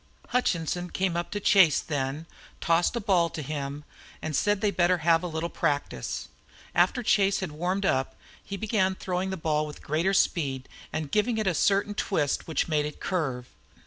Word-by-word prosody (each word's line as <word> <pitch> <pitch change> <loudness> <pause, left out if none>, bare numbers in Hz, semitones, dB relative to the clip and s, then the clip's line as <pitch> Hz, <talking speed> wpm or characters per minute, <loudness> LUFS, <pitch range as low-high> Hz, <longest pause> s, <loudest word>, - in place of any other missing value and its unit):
Hutchinson 180 -7 0
came 185 -2 -1
up 170 0 -2
to 205 - -3
Chase 190 -7 +5
then, 145 +1 -3 0.3
tossed 170 +6 +2
a - - 0
ball 185 -6 +2
to 155 - -6
him, 145 0 -4 0.4
and 155 -2 -3
said 205 +5 +2
they 210 0 +2
had 200 - -7
better 180 0 +4
have 165 -1 +5
a 180 - -3
little 160 0 -3
practice. 145 -3 -2 0.5
After 245 - +2
Chase 200 -2 +3
had 190 - -3
warmed 180 +6 -1
up 130 -6 0 0.3
he 200 - -6
began 195 -3 +1
throwing 185 0 -2
the 190 - -3
ball 155 -2 0
with 150 - -10
greater 170 +6 +1
speed 135 -9 +1 0.2
and 155 -3 -4
giving 220 +2 +1
it 215 - 0
a 190 - +2
certain 200 +5 +2
twist 160 -9 -1
which 160 - 0
made 150 -2 +1
it 150 - -9
curve. 135 -9 -2
175 Hz, 185 wpm, -27 LUFS, 150-195 Hz, 0.5 s, Chase